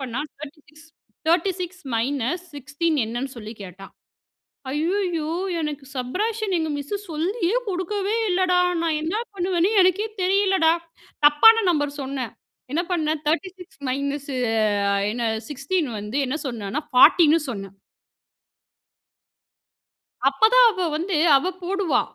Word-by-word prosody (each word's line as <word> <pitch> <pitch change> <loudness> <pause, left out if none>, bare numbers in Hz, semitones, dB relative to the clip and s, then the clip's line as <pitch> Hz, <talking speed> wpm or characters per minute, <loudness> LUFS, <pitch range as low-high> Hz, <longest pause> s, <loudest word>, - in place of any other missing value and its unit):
பண்ணா 260 0 -4 0.2
36 305 +2 -13 0.4
36 360 +1 0
மைனஸ் 270 +8 -1
16 300 +3 -1
என்னன்னு 240 +4 -4
சொல்லி 215 -1 -8
கேட்டா. 195 +1 -10 0.8
ஐய்யயோ 330 +1 -1 0.3
எனக்கு 295 -2 -4
சப்ட்றேக்ஷன் 405 - -2
எங்க 320 - -2
மிஸ் 285 +7 -5 0.2
சொல்லியே 360 +7 -1
குடுக்கவே 395 +3 -2
இல்லடா, 360 0 +2 0.2
நான் 320 -2 0
என்ன 320 +4 -2 0.2
பண்ணுவேன்னு 360 0 +1
எனக்கே 370 +4 +2
தெரியலடா. 380 -3 +3 0.5
தப்பான 370 +11 +7
நம்பர் 290 -3 -1
சொன்னேன். 260 -4 -4 0.4
என்ன 330 +4 +1
பண்ணேன் 315 -2 0
36 360 +3 -3
மைனஸு 280 +1 -3 0.8
என்ன 235 0 -1 0.2
16 295 +4 -1
வந்து 210 +5 -5
என்ன 260 - -2
சொன்னேன்னா 235 +2 -3 0.2
40 320 +4 +7
சொன்னேன். 195 -4 -7 2.6
அப்ப 270 - -16
தான் - - +8
அவ 380 -4 -3
வந்து, 345 +2 -2 0.2
அவ 275 - -2 0.2
போடுவா. 385 -1 +1
315 Hz, 110 wpm, -23 LUFS, 275-370 Hz, 2.6 s, தான்